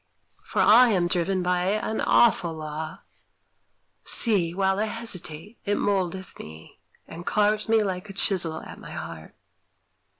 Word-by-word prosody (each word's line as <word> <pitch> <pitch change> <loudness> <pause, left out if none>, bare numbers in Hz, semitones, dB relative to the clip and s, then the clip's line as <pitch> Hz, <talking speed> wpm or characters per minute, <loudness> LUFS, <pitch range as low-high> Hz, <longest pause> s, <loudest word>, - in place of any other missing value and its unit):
For - - 0
I 240 +3 +7
am 185 -5 +2
driven 180 +2 0
by 180 0 0
an 215 +3 -1
awful 175 -8 +3
Law. 155 0 -6 1.0
See! 195 -7 +2
while 190 +2 0
I 215 - +1
hesitate, 210 -3 -6
it 205 0 0
mouldeth 190 -2 -2
me, 80 +1 -12 0.3
And 170 +1 -9
carves 210 +2 +1
me 220 -1 +4
like 190 0 -4
a - - -7
chisel 175 -5 +1
at - - -11
my - - -10
heart. 80 -1 -8
190 Hz, 140 wpm, -25 LUFS, 170-210 Hz, 1.0 s, I